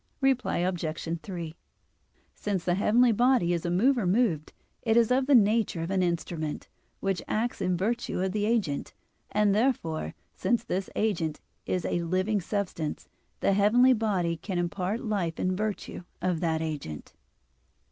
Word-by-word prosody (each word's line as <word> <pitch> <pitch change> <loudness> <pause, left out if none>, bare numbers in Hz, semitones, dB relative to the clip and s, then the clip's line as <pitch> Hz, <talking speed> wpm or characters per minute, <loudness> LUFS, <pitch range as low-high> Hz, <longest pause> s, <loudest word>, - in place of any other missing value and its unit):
Reply 270 -2 +1
Obj. 170 -2 -2
3: 170 -5 -6 0.8
Since 195 -4 -3
the 175 - +2
heavenly 230 +6 +4
body 240 -6 +3
is 170 0 -2
a - - 0
mover 225 +4 +3
moved, 180 -6 +1 0.3
it 225 -1 +2
is 235 0 +4
of 260 +1 +2
the 285 - +6
nature 215 -6 +3
of 170 - -4
an 190 -1 +2
instrument, 170 -3 -2 0.3
which 195 -2 0
acts 225 0 -1
in 180 -2 +1
virtue 230 +5 -1
of 190 0 0
the 210 +1 0
agent: 210 -11 -1 0.3
and 210 -1 +3
therefore 180 - 0 0.2
since 235 -2 0
this 190 -2 -2
agent 165 -8 0 0.3
is 180 -2 -1
a 175 - 0
living 185 +4 0
substance 180 -5 -3 0.3
the 195 - +3
heavenly 235 +6 +5
body 190 -7 0
can 185 +3 -4
impart 180 +5 -1
life 185 -7 -1
in 185 0 0
virtue 210 -2 -3 0.2
of 180 -3 0
that 160 -1 0
agent. 145 - -5
190 Hz, 155 wpm, -28 LUFS, 170-220 Hz, 0.8 s, the